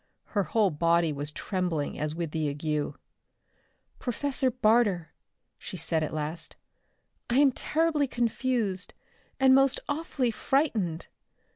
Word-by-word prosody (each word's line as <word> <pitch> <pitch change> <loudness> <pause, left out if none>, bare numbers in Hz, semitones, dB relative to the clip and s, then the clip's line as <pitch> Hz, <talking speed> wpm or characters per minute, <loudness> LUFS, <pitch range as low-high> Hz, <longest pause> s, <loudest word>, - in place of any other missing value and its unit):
Her 200 -4 +2
whole 205 +2 +2
body 165 +1 +2
was 145 +1 -4
trembling 175 -5 -2
as 150 +1 -2
with 165 -2 -3
the 155 -2 -1
ague. 150 +1 -2 1.0
"Professor 265 +1 0
Barter," 215 -8 +2 0.5
she - - -7
said 160 -1 0
at 155 - -2
last. 155 +2 -4 0.7
"I 240 - +2
am 280 -1 +6
terribly 305 +1 +1
confused, 235 -5 -1 0.4
and 265 -1 +6
most 270 0 +4
awfully 285 -5 -1
frightened. 215 - 0
200 Hz, 120 wpm, -28 LUFS, 160-260 Hz, 1.0 s, am